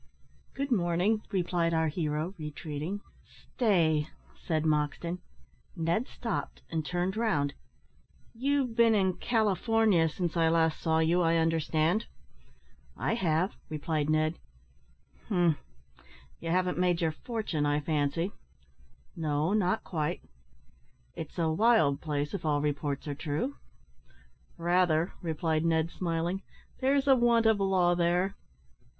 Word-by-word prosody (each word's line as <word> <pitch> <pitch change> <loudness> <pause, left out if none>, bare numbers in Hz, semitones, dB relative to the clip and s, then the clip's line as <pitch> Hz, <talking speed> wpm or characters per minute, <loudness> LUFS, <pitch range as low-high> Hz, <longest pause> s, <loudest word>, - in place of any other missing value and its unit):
"Good 275 0 -3
morning!" 185 +1 +2
replied 175 -4 0
our 160 0 +2
hero, 155 +2 -2
retreating. 155 +5 -5 0.5
"Stay!" 165 - +2 0.3
said 155 -2 -2
Moxton. 155 +3 0 0.6
Ned 170 +9 0
stopped, 230 -5 -4
and 160 -1 -1
turned 180 +4 -1
round. 155 -12 +1 0.8
"You've 260 0 0
been 230 -1 +5
in 190 -3 +1
California, 220 -5 +2
since 175 +1 -3
I 165 -1 +3
last 160 -1 +2
saw 160 -1 +2
you, 165 +3 +3
I 165 -1 +3
understand?" 165 +4 +1 0.9
"I - - 0
have," 180 -4 +1 0.2
replied 155 0 -1
Ned. 155 +1 +1 0.9
"Umph! 175 -6 +3 0.8
You - - -5
haven't 180 +1 +1
made 180 -2 +2
your 165 -2 +1
fortune, 180 - -2
I 145 0 +2
fancy?" 150 +4 -1 0.8
"No, 155 +2 0
not 210 0 +1
quite." 160 0 -3 0.9
"It's 160 +2 -8
a 165 -2 +1
wild 160 -7 +3
place, 150 -2 -2
if 200 - -4
all 150 -2 +1
reports 145 -1 -2
are 145 - -2
true?" 155 - -3 1.0
"Rather," 175 -1 +2
replied 160 -1 -1
Ned, 165 0 +1
smiling; 175 +2 -2 0.4
"there's 275 +1 +2
a 270 - +8
want 235 -2 +3
of 220 -2 +4
law 185 -3 +3
there." 175 +3 +1
170 Hz, 120 wpm, -29 LUFS, 155-195 Hz, 1.0 s, a